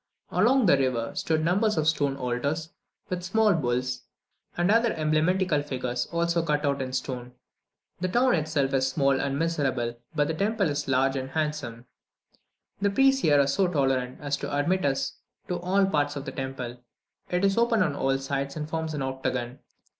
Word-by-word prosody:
Along 260 0 +4
the 140 -7 +5
river 125 -4 0
stood 155 -1 0
numbers 205 +4 +2
of 155 -1 +1
stone 145 -3 +1
altars, 140 +6 -2 0.4
with 180 -1 -2
small 210 +3 +3
bulls, 125 -4 -1 0.6
and 175 +3 +2
other 230 +1 +3
emblematical 155 +2 +1
figures, 125 -3 -3
also 170 0 0
cut 150 -2 0 0.2
in 130 -1 -3
stone. 125 -1 -4 0.7
The 185 - 0
town 245 +6 +3
itself 150 -4 0
is 130 -1 +2
small 135 0 +2
and 140 0 -1
miserable, 135 -7 -1 0.2
but 145 -1 +2
the 160 - -1
temple 200 0 0
is 145 0 -3
large 135 0 +2
and 130 0 -3
handsome. 145 -6 -3 1.0
The 200 - +3
priests 270 +5 +3
were 160 - +2
here 145 -1 +5
so 160 +8 +2
tolerant 135 -6 0
as 145 -1 -2
to - - -5
admit 145 +5 +1
us 135 -1 -1 0.3
to 180 -1 -1
all 190 +3 +2
parts 145 -5 0
of 140 -1 -5
the 135 - -4
temple. 130 -3 -5 0.5
It 180 +2 +1
is 195 0 +2
open 230 -3 +3
on 150 -5 -1
all 135 -1 +1
sides, 140 0 -3
and 150 -1 -4
forms 160 -1 -3
an 140 - -2
octagon. 130 -1 -3
145 Hz, 175 wpm, -27 LUFS, 135-175 Hz, 1.0 s, the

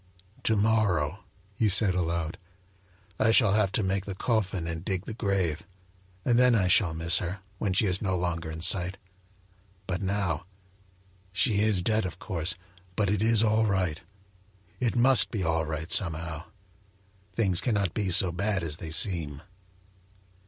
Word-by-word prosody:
"To 110 - +2
morrow," 100 -6 +1 0.3
he 105 +2 +1
said 100 -1 +5
aloud, 85 -2 -2 0.8
"I 110 - +3
shall 110 -3 +4
have 105 -2 +2
to 110 - 0
make 95 0 -1
the 100 - -5
coffin 95 -5 -1
and 80 0 -5
dig 95 0 -3
the - - -6
grave; 100 -8 -1 0.6
and 120 -1 +3
then 125 -1 +5
I 95 -4 +2
shall 90 -3 +3
miss 85 +3 +3
her, 90 +3 -5 0.2
when 100 -3 -1
she 100 - +2
is 95 -1 0
no 95 -3 -1
longer 85 -2 -3
in 80 0 -7
sight; 90 +2 +3 0.9
but 95 0 -3
now 95 -4 -2 0.8
she 100 +2 +2
is 105 -4 +2
dead, 110 -1 +1
of 85 -1 -9
course, 85 -3 -1 0.4
but 100 -1 0
it 105 -1 0
is 115 0 +4
all 110 0 +2
right 90 -6 -1 0.8
it 120 -2 -1
must 130 +2 +4
be 105 -5 -3
all 80 -1 0
right, 80 +1 -5
somehow. 80 -3 0 0.9
Things 95 -4 +2
cannot 100 -7 -1
be 100 -3 -1
so 90 0 +4
bad 100 +1 -1
as 75 -2 -3
they 80 - -7
seem." 80 -4 0
95 Hz, 160 wpm, -27 LUFS, 85-105 Hz, 0.9 s, said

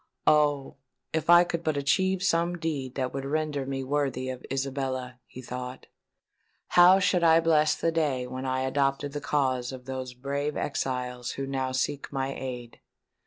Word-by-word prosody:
"Oh! 145 -3 +2 0.4
if 160 0 -1
I 175 0 +9
could 170 -1 -3
but 155 -3 0
achieve 190 +7 +1
some 175 -2 +1
deed 145 -6 -3
that 130 -2 -2
would 135 - -3
render 145 -1 -2
me 135 -1 -3
worthy 130 -2 -1
of 130 -1 -6
Isabella," 130 -2 -3
he 130 - -10
thought, 125 +1 -6 0.8
"how 180 +2 +7
should 180 -2 +2
I 165 0 +6
bless 155 -2 +3
the 165 - 0
day 145 -6 0
when 130 +1 -6
I 130 0 0
adopted 135 +1 0
the 145 - -4
cause 130 -4 0
of 130 -1 -9
those 130 -1 -5
brave 140 +3 -3
exiles 125 -3 -3
who 135 - -4
now 135 -1 -2
seek 130 +2 -2
my 135 -1 -2
aid! 125 -3 -7
135 Hz, 165 wpm, -27 LUFS, 130-155 Hz, 0.8 s, I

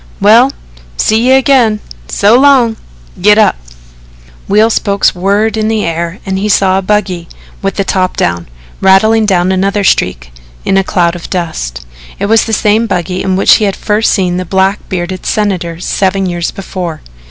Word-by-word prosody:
"Well, 230 +6 +5 0.5
see 225 +3 +1
you 260 - +6
again. 255 -5 +2 0.3
So 200 - +2
long. 255 -4 +4 0.5
Git 210 +2 +5
up!" 215 - +3 0.9
Wheel 215 +3 +3
spokes 200 -2 +1
whirred 200 +4 0
in 215 0 0
the 220 -1 -1
air 170 +2 -3
and 190 -1 -2
he 210 +2 -2
saw 190 -1 +2
a - - -3
buggy, 185 -4 -2 0.3
with 195 -1 -2
the 200 - 0
top 185 -1 -1
down, 85 0 -1 0.3
rattling 215 +3 +3
down 185 -2 +1
another 195 +2 0
street 60 - 0 0.3
in 195 - +1
a 195 - +3
cloud 175 -3 0
of 175 - -9
dust. 65 - -4 0.3
It - - -2
was 220 +2 +3
the 225 - -4
same 215 +1 +1
buggy 180 -2 -2
in 190 -1 -1
which 195 - +5
he 215 - 0
had 195 -2 -1
first 215 +1 0
seen 180 -3 0
the 185 - -2
black 190 +3 0
bearded 185 0 -4
Senator 180 -6 -2
seven 195 +1 -1
years 175 -2 -2
before. 180 -4 -6
195 Hz, 175 wpm, -11 LUFS, 180-215 Hz, 0.9 s, you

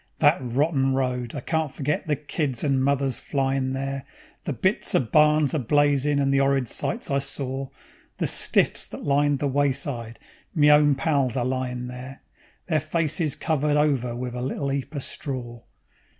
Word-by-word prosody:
That 145 -1 +4
rotten 135 +2 +1
road! 125 -2 -2
I 140 - -4
can't 160 +1 -1
forget 150 +6 -2
the 150 - +2
kids 145 -4 -3
and 135 -3 +1
mothers 135 -2 +1
flyin' 135 -1 -1
there, 135 0 -3 0.4
The - - -1
bits - - 0
of 115 - +1
barns 150 -1 +4
a 155 - +1
blazin' 145 +2 +2
and 135 -1 +2
the 135 - +3
'orrid 135 -2 +2
sights 230 - -2
I 140 - +2
sor; 135 -1 -3 0.5
The - - 0
stiffs - - +2
that - - -9
lined 145 0 +2
the 145 0 -1
wayside, 135 -4 -1 0.4
me 150 -2 +5
own 150 -1 +5
pals 135 -4 0
a 125 - 0
lyin' 125 -1 -2
there, 125 +2 -9 0.4
Their 160 -3 +1
faces 155 -1 0
covered 150 -1 0
over 135 -5 +1
wiv 125 0 -4
a 125 - -4
little 135 +2 -2
'eap 140 +2 -4
of 140 - -2
stror. 120 -4 -5
135 Hz, 170 wpm, -24 LUFS, 130-145 Hz, 0.5 s, me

